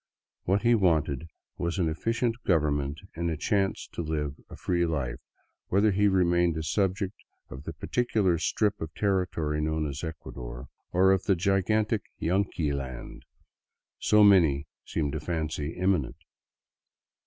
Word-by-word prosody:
What 100 Hz, +3 st, +1 dB
he 120 Hz, 0 st, +5 dB
wanted 80 Hz, -, +2 dB, 0.3 s
was 85 Hz, +2 st, -1 dB
an 90 Hz, -4 st, +1 dB
efficient 115 Hz, +8 st, 0 dB
government 75 Hz, -4 st, +1 dB, 0.2 s
and 85 Hz, +1 st, -2 dB
a 80 Hz, -, -2 dB
chance 95 Hz, +4 st, 0 dB
to -, -, -4 dB
live 75 Hz, -3 st, -2 dB, 0.2 s
a -, -, -9 dB
free 85 Hz, -1 st, 0 dB
life, 70 Hz, -7 st, -2 dB, 0.5 s
whether 100 Hz, +3 st, +3 dB
he 100 Hz, +2 st, +3 dB
remained 85 Hz, -3 st, +3 dB
a 80 Hz, -, -2 dB
subject 95 Hz, +3 st, 0 dB, 0.4 s
of 65 Hz, +2 st, -9 dB
the 80 Hz, -, -5 dB
particular 95 Hz, 0 st, +1 dB
strip 105 Hz, +3 st, 0 dB
of 80 Hz, -1 st, -4 dB
territory 90 Hz, -6 st, 0 dB
known 80 Hz, 0 st, 0 dB
as 70 Hz, +2 st, -5 dB
Ecuador, 60 Hz, -6 st, -7 dB, 0.2 s
or 95 Hz, +2 st, +5 dB
of 95 Hz, -1 st, +1 dB
the 95 Hz, -, +3 dB
gigantic 100 Hz, +4 st, +1 dB
" -, -, -46 dB
Yanqui 85 Hz, -4 st, 0 dB
land 65 Hz, -3 st, -6 dB, 0.4 s
" -, -, -63 dB
so 105 Hz, 0 st, +7 dB
many 80 Hz, -8 st, +5 dB, 0.2 s
seemed 75 Hz, -4 st, -1 dB
to 80 Hz, -, -3 dB
fancy 80 Hz, -1 st, -3 dB
imminent. 90 Hz, -7 st, 0 dB
85 Hz, 150 wpm, -28 LUFS, 75-95 Hz, 0.5 s, so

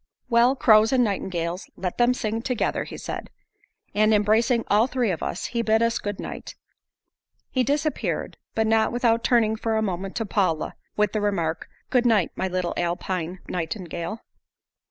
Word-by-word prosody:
"Well, 240 Hz, +3 st, +5 dB
crows 220 Hz, -3 st, +5 dB
and 255 Hz, -2 st, +4 dB
nightingales 185 Hz, -4 st, -2 dB
let 180 Hz, +3 st, -4 dB
them 245 Hz, +1 st, +4 dB
sing 225 Hz, -1 st, -2 dB
together," 250 Hz, -1 st, -1 dB
he -, -, -8 dB
said; -, -, -6 dB, 0.6 s
and 215 Hz, +1 st, +4 dB
embracing 225 Hz, +3 st, +3 dB
all 215 Hz, +4 st, +4 dB
three 250 Hz, -5 st, 0 dB
of 165 Hz, -, -4 dB
us, 180 Hz, -, -3 dB
he 235 Hz, -, +1 dB
bid 225 Hz, 0 st, +3 dB
us 230 Hz, 0 st, +1 dB
goodnight. 205 Hz, -1 st, -6 dB, 1.0 s
He 255 Hz, -, +2 dB
disappeared, 295 Hz, +4 st, -1 dB, 0.2 s
but 220 Hz, -, +2 dB
not 220 Hz, 0 st, +3 dB
without 235 Hz, -1 st, +2 dB
turning 220 Hz, -3 st, +3 dB
for 225 Hz, 0 st, -1 dB
a 220 Hz, -, +1 dB
moment 190 Hz, -1 st, -3 dB
to 225 Hz, -, -1 dB
Paula 185 Hz, -6 st, 0 dB, 0.2 s
with 210 Hz, 0 st, +2 dB
the 215 Hz, -, 0 dB
remark, 170 Hz, -6 st, -1 dB, 0.2 s
"Good 250 Hz, -2 st, +3 dB
night, 210 Hz, -7 st, +3 dB
my 190 Hz, -, -1 dB
little 180 Hz, -1 st, -2 dB
Alpine 175 Hz, 0 st, -2 dB
nightingale." 175 Hz, +3 st, -4 dB
215 Hz, 160 wpm, -24 LUFS, 185-235 Hz, 1.0 s, Well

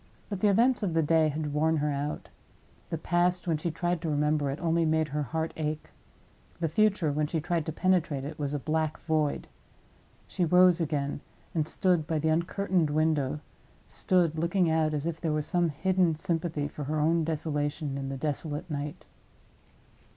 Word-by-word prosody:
But 200 Hz, -3 st, -3 dB
the 210 Hz, -, +3 dB
events 235 Hz, +6 st, +3 dB
of 180 Hz, -6 st, -1 dB
the 165 Hz, -, +3 dB
day 160 Hz, +1 st, +3 dB
had 150 Hz, 0 st, -3 dB
worn 160 Hz, +2 st, +2 dB
her 150 Hz, 0 st, 0 dB
out. 145 Hz, +1 st, -3 dB, 0.6 s
The 165 Hz, -, -2 dB
past, 175 Hz, +3 st, +1 dB
when 165 Hz, -2 st, +2 dB
she 165 Hz, +3 st, -2 dB
tried 175 Hz, +1 st, -1 dB
to 165 Hz, -, -2 dB
remember 150 Hz, -1 st, +1 dB
it, 135 Hz, -, -4 dB
only 170 Hz, 0 st, +1 dB
made 160 Hz, -1 st, +1 dB
her 150 Hz, +2 st, -2 dB
heart 160 Hz, +3 st, -2 dB
ache. 155 Hz, -1 st, -4 dB, 0.7 s
The 165 Hz, -, +1 dB
future, 190 Hz, -2 st, +2 dB
when 150 Hz, +1 st, 0 dB
she 160 Hz, +1 st, -1 dB
tried 165 Hz, +1 st, -1 dB
to -, -, -1 dB
penetrate 165 Hz, -5 st, +1 dB
it, 150 Hz, +2 st, -7 dB
was 145 Hz, 0 st, -1 dB
a -, -, -1 dB
black 155 Hz, +1 st, -1 dB
void. 155 Hz, -3 st, 0 dB, 0.8 s
She 185 Hz, -, -2 dB
rose 180 Hz, +1 st, +5 dB
again, 145 Hz, -3 st, -2 dB, 0.3 s
and 155 Hz, -2 st, 0 dB
stood 175 Hz, -2 st, +1 dB
by 160 Hz, -, 0 dB
the 160 Hz, +1 st, +1 dB
uncurtained 170 Hz, 0 st, +1 dB
window—stood 155 Hz, -, -1 dB
looking 170 Hz, +1 st, +2 dB
out, 155 Hz, -1 st, +1 dB
as 145 Hz, 0 st, -2 dB
if 165 Hz, -1 st, -3 dB
there 160 Hz, -3 st, 0 dB
was 150 Hz, -1 st, -1 dB
some 175 Hz, -2 st, +2 dB
hidden 175 Hz, +2 st, +1 dB
sympathy 165 Hz, -2 st, -2 dB
for 145 Hz, 0 st, -7 dB
her 155 Hz, +2 st, -1 dB
own 165 Hz, +2 st, +2 dB
desolation 150 Hz, -2 st, -2 dB
in 135 Hz, -1 st, -4 dB
the 135 Hz, -, -4 dB
desolate 150 Hz, +2 st, -3 dB
night. 150 Hz, +3 st, -5 dB
160 Hz, 180 wpm, -28 LUFS, 150-170 Hz, 0.8 s, rose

